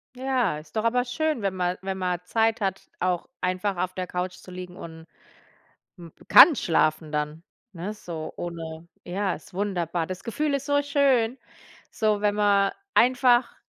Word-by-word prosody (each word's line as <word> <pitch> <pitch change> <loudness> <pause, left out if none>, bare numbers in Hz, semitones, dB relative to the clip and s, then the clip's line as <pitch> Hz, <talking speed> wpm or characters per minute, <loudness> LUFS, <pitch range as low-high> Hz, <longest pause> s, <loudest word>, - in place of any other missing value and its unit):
Ja, 255 - 0
ist 155 - -17
doch 215 - 0
aber 245 +2 +2
schön, 305 0 -1
wenn 195 -1 -1
mal 180 0 -1
wenn 190 0 -3
man 180 -2 -1
Zeit 225 +3 +1
hat, 195 -2 -1 0.2
auch 180 +3 -1
einfach 185 +1 -1
auf 185 +1 -2
der 185 -1 -4
Couch 180 0 -3
zu 185 - -14
liegen 180 0 -8
und 160 -1 -10 0.9
m 170 -2 -11 0.2
kann 320 - +9
schlafen 155 -1 +1
dann, 150 +2 -2 0.3
ne, 190 +5 -5
so 165 -5 -7
ohne 165 -1 -6 0.2
ja, 190 +1 -1
ist 165 - -12
wunderbar. 175 -4 -1
Das 185 +1 -7
Gefühl 290 +5 -1
ist 280 +1 -2
so 285 0 +2
schön, 270 -4 +2 0.5
so, 215 -2 0
wenn 205 0 +2
man 200 -1 +3 0.2
einfach 245 -1 +4
190 Hz, 165 wpm, -25 LUFS, 175-230 Hz, 0.9 s, kann